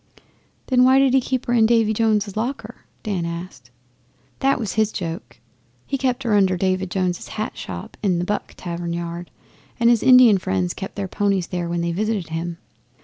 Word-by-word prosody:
'Then 250 -1 +3
why 260 +1 +6
did 270 -1 +4
he 265 - +5
keep 260 0 -2
her 240 - 0
in 225 -2 +5
Davy 225 -2 +3
Jones's 215 -2 +1
locker?' 245 +6 -5 0.2
Dan 195 -6 -2
asked. 170 -7 -7 0.7
'That 270 -1 +2
was 220 -5 -3
his 215 -1 +1
joke. 170 0 -6 0.5
He - - -2
kept 260 -1 -1
her 230 -3 0
under 190 -3 +3
David 185 0 0
Jones's 180 -1 -2
hat 215 0 -4
shop 90 -2 -7
in 190 -4 +1
the 175 - -1
"Buck" 205 +2 -3
tavern 170 -1 -4
yard, 170 0 -5 0.5
and 235 0 +5
his 235 - +3
Indian 250 -6 +7
friends 95 - -1
kept 190 - -7
their 200 -1 -3
ponies 200 -2 0
there 175 -1 -3
when 170 0 -1
they 170 0 -1
visited 205 -1 -2
him. 165 +1 -4
200 Hz, 190 wpm, -22 LUFS, 175-230 Hz, 0.7 s, Indian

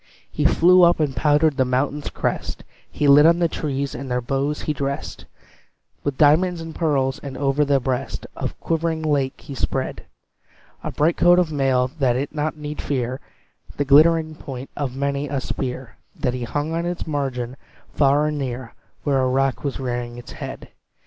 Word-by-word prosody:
He - - -2
flew 180 +2 +6
up, 175 -1 +5
and 145 -4 0
powdered 150 +3 +3
the 130 - +4
mountain's 135 +3 -1
crest; - - -3 0.3
He 150 - 0
lit 145 +2 +8
on 170 +1 +5
the 170 -1 +2
trees, 140 -3 -3
and 135 +2 -6
their 125 0 0
boughs 135 +4 -2
he 155 - -1
dressed 140 -1 -4 0.8
With 140 -2 -2
diamonds 170 +4 +4
and 165 0 -7
pearls; 140 -6 0
and 135 -2 -7
over 140 +1 +2
the 140 -1 +2
breast 130 -1 -3
Of - - -2
the - - -17
quivering 165 -1 -1
lake 140 -3 0
he 140 - -9
spread 130 0 -3 0.8
A - - -3
bright 160 +3 +1
coat 175 0 +6
of 175 -3 +2
mail, 135 -3 +2
that 125 -3 +2
it 140 +3 -2
need 150 0 -3
not - - -2
fear 130 -2 -2 0.6
The 145 - 0
glittering 155 +3 +5
point 135 -4 -8
of 135 -3 -3
many 140 +1 -1
a 140 -1 -1
spear 130 -3 -5 0.2
That 125 - -1
he 125 -1 -3
hung 145 +7 -2
on 170 +1 -1
its 175 0 -3
margin, 130 -5 -3 0.4
far 145 +1 +3
and 150 -1 -1
near, 125 -3 -5 0.3
Where 140 -3 +2
a 130 - +1
rock 135 0 0
was 140 -2 -3
rearing 120 -2 -3
its 120 -1 -10
head. - - -8
140 Hz, 185 wpm, -22 LUFS, 130-155 Hz, 0.8 s, lit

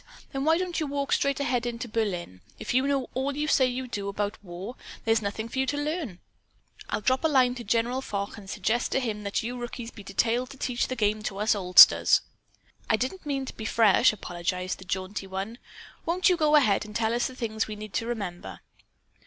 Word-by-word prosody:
Then 270 +1 -2
why 320 +1 +4
don't 360 -1 -2
you 310 - -1
walk 280 0 -1
straight 280 0 +1
ahead 245 -3 0
into 240 +1 -4
Berlin? 185 - -3 0.2
If - - -4
you 260 +2 +3
know 275 -3 -1
all 275 +2 -2
you 300 +1 -1
say 260 -4 +4
you 255 +1 -3
do, 200 -4 -4
about 205 +1 -3
war, 185 +6 -7 0.3
there's 225 0 +3
nothing 205 +2 -3
more 230 - -10
for 265 - -2
you 265 - +2
to 290 - -1
learn. 295 - -3 0.7
I'll - - -1
drop 260 +7 +1
a - - +5
line 260 -5 +4
to 245 -1 -7
General 235 +4 0
Foch 200 -5 -4
and 200 -3 -11
suggest 220 +5 0
to - - +3
him 220 -5 -3
that 200 +1 -2
you 245 +2 -4
rookies 240 -1 -6
be 210 - -11
detailed 230 +5 0
to 275 - -11
teach 250 -1 -1
the 255 - -3
game 215 -2 +1
to 195 -2 -4
us 210 +3 +2
oldsters." 180 -3 +7 0.7
"I - - +5
didn't 295 - -4
mean 275 -2 -1
to - - -7
be 220 - -7
fresh," 225 +1 +5
apologized 180 -2 -3
the 190 - -11
jaunty 190 +2 -4
one. 195 +5 -5 0.4
"Won't 360 +3 +2
you 365 - +4
go 305 -2 +3
ahead 235 -10 +4
and 210 0 -11
tell 225 0 +1
us 240 - +1
the 260 - -10
things 225 -3 -2
we 215 - -5
need 210 -1 -9
to 230 - -1
remember?" 200 -7 -5
230 Hz, 225 wpm, -27 LUFS, 205-265 Hz, 0.7 s, oldsters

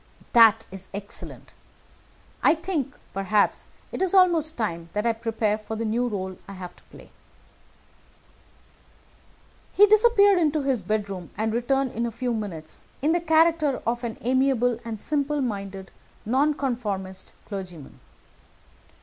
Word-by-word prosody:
"That 225 -1 +7
is 190 0 -10
excellent. 200 0 -9 0.9
I - - +5
think, 315 -5 -3 0.2
perhaps, 195 +2 +1 0.2
it - - -5
is 380 0 +2
almost 335 -4 +4
time 170 -7 -3
that 210 +2 -1
I 230 - +3
prepared 220 -1 -1
for 220 +1 -5
the 225 +1 -3
new 240 +3 0
rôle 190 -3 -5
I 195 - -8
have 180 -2 -8
to - - -21
play." - - -16 2.6
He 410 - +7
disappeared 415 -2 +5
into 305 -3 +1
his 265 -5 0
bedroom, 200 -2 -3
and 220 0 0
returned 260 +2 0
in 235 +1 -2
a - - -4
few 240 +2 -2
minutes 185 -8 -6 0.2
in 305 - +3
the 345 +1 +1
character 320 -3 +3
of 240 +1 -1
an 230 -2 -4
amiable 250 -1 +2
and 225 -2 -5
simple 295 +3 -1
minded 195 -6 -4 0.3
Nonconformist 235 -8 -1
clergyman. 180 -8 -8
230 Hz, 135 wpm, -25 LUFS, 205-290 Hz, 2.6 s, That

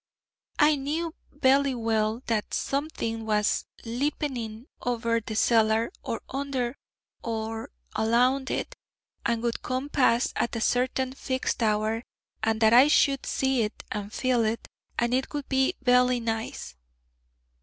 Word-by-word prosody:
'I 300 -1 +5
knew 315 +4 -2 0.2
vely 275 -1 +3
well 225 0 0
that 220 -3 -1
something 275 -6 -2
was 210 -1 +1 0.2
lipening 240 -2 -3 0.2
over 230 -1 0
the 220 0 -6
cellar, 225 +2 +3
or - - -4
under, 270 -2 -2 0.5
or 225 -1 -3 0.3
alound 250 +4 +2
it, - - -3 0.5
and 235 0 0
would 235 -1 -1
come 255 +3 -3
to - - -29
pass 245 -3 +3
at 235 - -1
a - - -1
certain 255 +2 +1
fixed 260 -2 -2
hour, 215 +1 +1 0.4
and 220 0 0
that 220 0 +6
I 255 +4 +8
should 275 -2 +3
see 265 -2 +1
it, 210 -1 -3
and 205 -1 -4
feel 250 -1 +1
it, 220 +1 -2 0.3
and 240 +1 +1
it 260 +1 0
would 290 -2 -3
be 265 0 +2
vely 250 0 +5
nice.' 225 - -4
240 Hz, 140 wpm, -27 LUFS, 225-265 Hz, 0.5 s, I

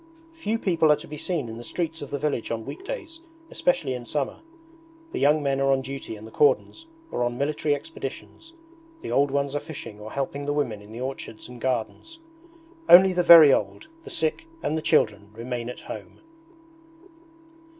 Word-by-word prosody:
Few 230 -9 -2
people 170 -7 +3
are - - +6
to - - -11
be 150 - -7
seen 150 -4 -3
in 115 0 -7
the 120 - -8
streets 165 +5 -4
of 145 - -7
the 145 - -2
village 140 -5 -2
on 115 -1 -3
weekdays, 370 -4 -7 0.3
especially 270 - 0
in 125 -1 -5
summer. 140 +3 -3 0.7
The - - -3
young 150 +2 +3
men 135 -1 0
are 135 0 +3
on 135 0 +2
duty 135 -3 -6
in 105 +1 -11
the 110 - -11
cordons 150 - +1 0.2
or 120 - -1
on 120 0 -1
military 145 +1 0
expeditions; 325 - -8 0.5
the - - -5
old 140 +1 +3
ones 140 0 -1
are 145 - 0
fishing 135 -9 -9
or 105 +1 -9
helping 140 +1 -3
the 145 - +1
women 120 -8 -2
in 105 +1 -14
the 115 +2 -7
orchards 130 -4 -6
and 125 -1 -12
gardens. 130 - -3 0.7
Only 185 +2 +9
the 180 - +2
very 165 -5 +9
old, 315 - -2
the - - -10
sick, 160 - -1 0.2
and 155 - 0
the 160 - -1
children, 110 -10 +2
remain 120 +1 -4
at 125 - -8
home. - - -9
140 Hz, 190 wpm, -25 LUFS, 125-165 Hz, 0.7 s, Only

